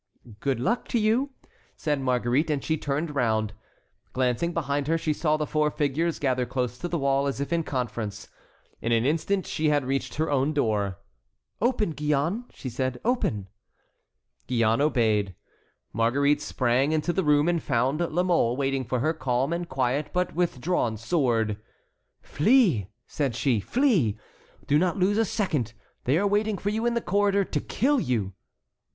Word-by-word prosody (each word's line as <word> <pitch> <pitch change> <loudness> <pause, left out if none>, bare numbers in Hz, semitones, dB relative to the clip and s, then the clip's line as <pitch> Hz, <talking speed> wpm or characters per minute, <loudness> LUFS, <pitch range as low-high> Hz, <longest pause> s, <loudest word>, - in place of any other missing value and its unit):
"Good 135 -1 -1
luck 235 - 0
to 235 - 0
you," 225 +6 +2 0.5
said 150 -3 -1
Marguerite, 125 +3 +1
and 145 -3 -1
she 160 - 0
turned 150 +1 -2
round. 110 -5 0 0.6
Glancing 130 +6 0
behind 145 -4 -1
her, 165 +1 +2
she 155 -1 0
saw 155 0 +1
the 155 - -1
four 150 0 +1
figures 150 +3 -1
gather 130 -3 0
close 125 -1 -3
to 175 - -3
the 175 - -1
wall 140 -1 +1
as 140 - -3
if 140 +4 -2
in 170 - +2
conference. 115 -8 -4 0.5
In 115 - -1
an 115 0 +3
instant 165 +6 0
she 155 0 0
had 145 -3 +2
reached 135 +1 -2
her 160 +2 0
own 140 +2 +1
door. 105 -9 0 0.6
"Open, 225 -6 +1
Gillonne," 150 - 0
said 130 0 -3
she, - - -11
"open." 110 - 0 1.0
Gillonne 115 0 +2
obeyed. 110 - +1 0.6
Marguerite 140 +6 +2
sprang 130 +4 +1
into 160 +3 0
the 190 - 0
room 150 0 +3
and 170 -2 +1
found 135 +3 0
La 175 +1 0
Mole 165 -10 +2
waiting 135 -1 0
for 125 0 -2
her, 155 +4 +1
calm 135 0 0
and 170 0 -3
quiet, 130 +2 0
but 180 0 -1
with 175 -6 0
drawn 125 -8 0
sword. 115 -5 0 0.7
"Flee," 175 - +3 0.2
said 140 -6 -2
she, 125 -4 +1
"flee. 175 - +2 0.5
Do 145 - +3
not 180 -1 +1
lose 200 +3 +2
a 225 - +3
second. 150 - -1 0.3
They 135 +5 +3
are 200 - +1
waiting 205 +1 +1
for 200 - -2
you 225 +2 0
in 240 - 0
the 235 - 0
corridor 200 0 +2
to - - -2
kill 275 +5 +1
you." 110 - -1
145 Hz, 170 wpm, -26 LUFS, 125-170 Hz, 1.0 s, an